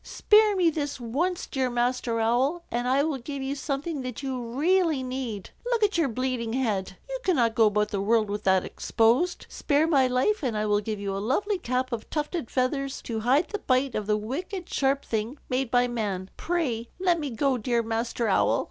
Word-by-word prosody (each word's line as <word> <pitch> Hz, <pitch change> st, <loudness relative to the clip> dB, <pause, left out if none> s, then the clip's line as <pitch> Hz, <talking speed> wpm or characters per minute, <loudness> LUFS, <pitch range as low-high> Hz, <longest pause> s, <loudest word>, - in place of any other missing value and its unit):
Spare 425 Hz, -1 st, +4 dB
me 350 Hz, -3 st, +3 dB
this 290 Hz, -3 st, -3 dB
once, 300 Hz, +10 st, -1 dB
dear 260 Hz, -2 st, -1 dB
Master 240 Hz, -1 st, 0 dB
Owl, 255 Hz, +9 st, +1 dB
and 240 Hz, +1 st, -1 dB
I 270 Hz, +2 st, +3 dB
will 300 Hz, -3 st, -1 dB
give 275 Hz, +2 st, -5 dB
you 270 Hz, +1 st, -2 dB
something 285 Hz, +2 st, -3 dB
that 255 Hz, +1 st, -6 dB
you 260 Hz, -2 st, -3 dB
really 305 Hz, +5 st, +1 dB
need. 255 Hz, -6 st, -5 dB
Look 475 Hz, -2 st, 0 dB
at 415 Hz, -1 st, +2 dB
your 330 Hz, -4 st, +3 dB
bleeding 245 Hz, -1 st, -2 dB
head. 205 Hz, -7 st, -1 dB
You -, -, -4 dB
cannot 245 Hz, -11 st, +2 dB
go 220 Hz, -1 st, +5 dB
about 210 Hz, 0 st, +1 dB
the 200 Hz, -2 st, -2 dB
world 220 Hz, +1 st, +2 dB
with 205 Hz, +1 st, -4 dB
that 190 Hz, -1 st, +3 dB
exposed. 245 Hz, +11 st, +1 dB
Spare 295 Hz, +2 st, +1 dB
my 280 Hz, -5 st, +4 dB
life, 255 Hz, +13 st, +1 dB
and 245 Hz, -7 st, -1 dB
I 210 Hz, -, 0 dB
will 205 Hz, 0 st, +2 dB
give 215 Hz, 0 st, -4 dB
you 200 Hz, -1 st, -3 dB
a -, -, -2 dB
lovely 370 Hz, -, 0 dB
cap 255 Hz, -2 st, -1 dB
of 230 Hz, -2 st, -5 dB
tufted 300 Hz, -3 st, -3 dB
feathers 270 Hz, +1 st, -1 dB
to 225 Hz, -2 st, -3 dB
hide 260 Hz, +9 st, +2 dB
the 415 Hz, -, -3 dB
bite 260 Hz, -4 st, +1 dB
of 210 Hz, -1 st, -3 dB
the 210 Hz, 0 st, +2 dB
wicked 335 Hz, -, -5 dB
sharp 275 Hz, 0 st, +1 dB
thing 225 Hz, +5 st, -2 dB
made 255 Hz, -1 st, 0 dB
by 245 Hz, 0 st, +3 dB
man. 205 Hz, -6 st, -3 dB
Pray, 260 Hz, -10 st, -2 dB
let 355 Hz, -2 st, +2 dB
me 295 Hz, -2 st, -3 dB
go, 255 Hz, +2 st, 0 dB
dear 235 Hz, +1 st, 0 dB
Master 230 Hz, +1 st, -1 dB
Owl." 195 Hz, -, +3 dB
255 Hz, 205 wpm, -26 LUFS, 225-295 Hz, -, go